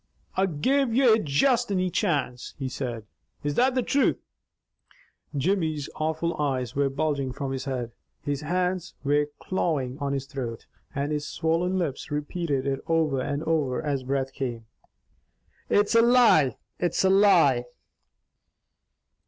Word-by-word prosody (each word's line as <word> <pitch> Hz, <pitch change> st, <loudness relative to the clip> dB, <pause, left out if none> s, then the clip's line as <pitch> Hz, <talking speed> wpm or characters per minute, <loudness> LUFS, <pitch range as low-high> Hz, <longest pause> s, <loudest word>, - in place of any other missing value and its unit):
"I'll 190 Hz, +1 st, +2 dB
give 240 Hz, -, +1 dB
ye 240 Hz, -4 st, +5 dB
juist 235 Hz, -, +2 dB
ane 185 Hz, -2 st, 0 dB
chance," 145 Hz, -, -1 dB
he 135 Hz, -, -3 dB
said. 120 Hz, -4 st, -4 dB, 0.4 s
"IS 145 Hz, 0 st, -1 dB
THAT 255 Hz, -, +2 dB
THE 255 Hz, -, +2 dB
TRUTH?" 280 Hz, +3 st, +2 dB, 1.2 s
Jimmy's 155 Hz, -2 st, 0 dB
awful 160 Hz, +2 st, -1 dB
eyes 130 Hz, -4 st, -1 dB
were 140 Hz, 0 st, +2 dB
bulging 140 Hz, -1 st, -1 dB
from 135 Hz, +1 st, -4 dB
his 135 Hz, +1 st, -4 dB
head, 125 Hz, -4 st, -3 dB, 0.3 s
his 145 Hz, 0 st, -2 dB
hands 180 Hz, +2 st, -1 dB
were 145 Hz, +1 st, +2 dB
clawing 145 Hz, -9 st, -1 dB
at -, -, -18 dB
Dannie's -, -, -18 dB
on 140 Hz, 0 st, -1 dB
his 135 Hz, -1 st, -2 dB
throat, 125 Hz, -5 st, -6 dB, 0.3 s
and 140 Hz, +2 st, -1 dB
his 150 Hz, -1 st, -2 dB
swollen 165 Hz, +6 st, 0 dB
lips 160 Hz, -7 st, -3 dB
repeated 150 Hz, -1 st, -2 dB
it 135 Hz, -1 st, -1 dB
over 155 Hz, -5 st, +1 dB
and 145 Hz, +3 st, -2 dB
over 155 Hz, -6 st, 0 dB
as 145 Hz, -4 st, -1 dB
breath 135 Hz, 0 st, -2 dB
came, 120 Hz, -5 st, -4 dB, 1.0 s
"It's 205 Hz, +2 st, +3 dB
a 230 Hz, -, +7 dB
lie! 230 Hz, -, +5 dB, 0.2 s
It's 175 Hz, +1 st, +1 dB
a 190 Hz, -, +4 dB
lie!" 170 Hz, -11 st, +5 dB
150 Hz, 145 wpm, -26 LUFS, 135-180 Hz, 1.2 s, a